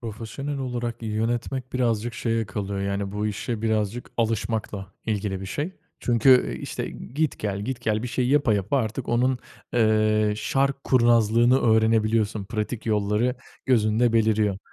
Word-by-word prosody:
Profesyonel 115 +6 -5
olarak 120 -3 -4
yönetmek 120 +4 -2
birazcık 120 -2 0
şeye 115 -2 -1
kalıyor, 100 -1 -4
yani, 100 0 -2
bu 105 +1 -1
işe 110 +1 -3
birazcık 110 +1 -1
alışmakla 110 -3 -2
ilgili 100 -3 -2
bir 95 - -6
şey. 145 - -3 0.3
Çünkü, 125 +2 +5
eee, - - -8
işte, - - -4
git 150 +4 -3
gel 100 -2 -2
git 125 +2 -4
gel 110 -2 0
bir 125 - -3
şey 125 +1 0
yapa 140 -5 +3
yapa 100 +6 0
artık 115 +1 -3
onun, 125 +2 +2 0.4
eee, 110 -2 +3
şark 135 +6 0
kurnazlığını 120 0 +4
öğrenebiliyorsun 110 -2 +2
pratik 110 +2 -4
yolları 105 +3 +1 0.3
gözünde 115 -1 +3
beliriyor 110 -3 +2
115 Hz, 145 wpm, -25 LUFS, 105-120 Hz, 0.4 s, Çünkü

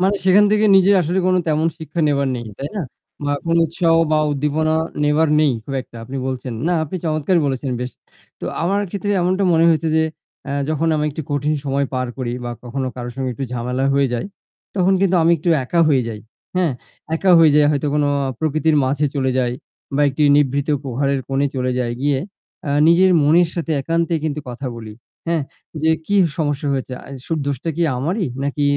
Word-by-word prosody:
মানে 195 +2 +2
সেখান 190 +2 +6
থেকে 215 0 +3
নিজের 195 +1 +5
আসলে 175 +3 0 0.3
তেমন 155 +1 +1
শিক্ষা 160 +1 -4
নেবার 140 -2 +1
নেই। 120 - -6
তাই 140 - -4
না? 200 - -1 0.4
বা 145 - 0
কোনো 165 0 +3
উৎসাহ 165 +1 +1 0.2
বা 155 - +4
উদ্দীপনা 150 +2 0 0.3
নেবার 150 +2 +3
নেই 150 -4 +3
খুব 135 - -6
একটা 120 - -16
আপনি 135 +3 -7
বলছেন। 130 -1 -4 0.2
না - - +2
আপনি 170 +5 -5
চমৎকার 155 +3 +1
বলেছেন 135 0 -2
বেশ। 125 - -3 0.5
তো - - -5 0.2
আমার 195 +4 +1
ক্ষেত্রে 205 +1 -3
এমনটা 185 +3 +1
মনে 165 0 +4
হয়েছে 160 0 +2
যে 160 - +4 0.5
আ - - -3 0.2
যখন 155 +1 0
আমি 150 - 0
একটু 160 - -5
কঠিন 145 +2 0
সময় 140 0 0
পার 130 0 -1
করি 125 -2 -2
বা 120 - -3
কখনো 130 +2 -3
কারো 120 -1 -5
সঙ্গে 130 -1 -2
একটু 135 - -4
ঝামেলা 125 +2 -2
হয়ে 140 -1 +3
যায়। 120 - -3 0.5
তখন 190 0 +2
কিন্তু 190 -2 +3
আমি 165 +1 +4
একটু 170 - -3 0.2
একা 170 +6 +1
হয়ে 135 -4 +3
যাই। 110 -2 -6 0.4
হ্যাঁ 175 -6 +2 0.4
একা 185 +3 +2
হয়ে 160 -2 +6
যাই 150 - +5
হয়তো 145 0 -1
কোনো 150 -1 +2 0.2
আ - - -2
প্রকৃতির 155 0 +1
মাঝে 140 +3 +1
চলে 130 -2 0
যাই। 120 -1 +1 0.4
বা 145 - +1
একটি 140 +2 -2
নিভৃত 140 0 +1
প্রহারের 135 +1 -1
কোণে 135 +1 +1
চলে 130 0 0
যায় 120 -2 -1
গিয়ে 140 -1 +1 0.5
আ - - 0 0.2
নিজের 185 +3 +5
মনের 165 +4 +4
সাথে 165 -2 -2
একান্তে 165 +3 0
কিন্তু 150 -1 -2
কথা 125 +2 -6
বলি। 110 -2 -8 0.3
হ্যাঁ, 165 -2 0 0.4
যে 160 - +3 0.2
কি 205 - -1 0.2
সমস্যা 145 -2 -1
হয়েছে 130 -1 -3
আ - - -14 0.2
শুধু 165 -2 -1
দোষটা 140 +3 -2
কি 170 - +1
আমারই 175 - -1 0.2
নাকি 145 +1 -2
150 Hz, 200 wpm, -19 LUFS, 135-165 Hz, 0.5 s, সেখান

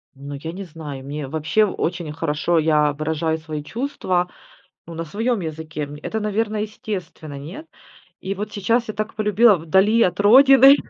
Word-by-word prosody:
Ну, 140 +1 -8
я 160 +4 -6
не 195 +3 -7
знаю, 150 -6 -8
мне 145 0 -5
вообще 160 +9 +1
очень 175 -4 -3
хорошо, 160 +2 0
я 150 -2 +3
выражаю 160 +1 -1
свои 155 -2 -6
чувства, 185 - -2 0.6
ну, 165 - -9
на 165 +1 -5
своем 225 +7 -1
языке. 155 -2 -5
М, 145 +1 -7
это, 220 - -2
наверно, 215 +1 -1
естественно, 195 -8 -6
нет? 175 - -9 0.5
И 190 - -3
вот 210 +1 -5
сейчас 230 +4 0
я 215 - -2
так 215 +1 -4
полюбила 215 +1 +4
вдали 190 +7 +3
от 180 -2 +2
родины, 270 +5 +8
175 Hz, 165 wpm, -21 LUFS, 155-215 Hz, 0.6 s, родины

